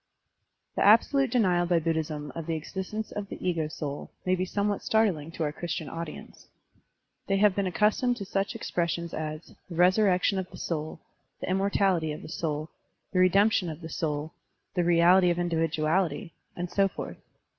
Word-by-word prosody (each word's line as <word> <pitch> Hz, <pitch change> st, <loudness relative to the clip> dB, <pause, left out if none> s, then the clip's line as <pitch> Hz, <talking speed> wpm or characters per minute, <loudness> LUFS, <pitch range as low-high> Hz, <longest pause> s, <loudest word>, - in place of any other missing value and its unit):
The -, -, +1 dB
absolute 260 Hz, +6 st, +5 dB
denial 185 Hz, -7 st, +2 dB
by 175 Hz, -1 st, +3 dB
Buddhism 155 Hz, -3 st, -2 dB
of 165 Hz, -1 st, -6 dB
the 165 Hz, -, 0 dB
existence 190 Hz, +7 st, -5 dB
of 205 Hz, -1 st, -5 dB
the -, -, -6 dB
ego 165 Hz, -3 st, 0 dB
soul 145 Hz, -2 st, -5 dB, 0.2 s
may 185 Hz, -, +2 dB
be 185 Hz, 0 st, 0 dB
somewhat 205 Hz, +2 st, -1 dB
startling 195 Hz, -9 st, +1 dB
to 165 Hz, -, -2 dB
our 150 Hz, -, 0 dB
Christian 160 Hz, -1 st, -4 dB
audience. 165 Hz, -1 st, -8 dB, 0.8 s
They 195 Hz, -, +2 dB
have 205 Hz, -1 st, +5 dB
been 200 Hz, -1 st, 0 dB
accustomed 215 Hz, +6 st, +2 dB
to 200 Hz, -, -5 dB
such 195 Hz, +4 st, -1 dB
expressions 170 Hz, -5 st, -2 dB
as 155 Hz, +1 st, -5 dB, 0.2 s
"the 170 Hz, -, -7 dB
resurrection 185 Hz, +2 st, +3 dB
of 185 Hz, -1 st, -5 dB
the -, -, -11 dB
soul," 155 Hz, -1 st, -4 dB, 0.4 s
"the -, -, -3 dB
immortality 190 Hz, -4 st, +2 dB
of 150 Hz, -, -8 dB
the -, -, -9 dB
soul," 155 Hz, -1 st, -3 dB, 0.4 s
"the 185 Hz, -, +2 dB
redemption 195 Hz, 0 st, +4 dB
of 160 Hz, +1 st, -7 dB
the 160 Hz, -, -7 dB
soul," 155 Hz, 0 st, -3 dB, 0.4 s
"the 180 Hz, -, +1 dB
reality 175 Hz, +2 st, +5 dB
of 175 Hz, -, +1 dB
individuality," 165 Hz, -1 st, 0 dB, 0.2 s
and 175 Hz, 0 st, -4 dB
so 195 Hz, -1 st, +3 dB
forth. -, -, -7 dB
175 Hz, 170 wpm, -28 LUFS, 160-195 Hz, 0.8 s, absolute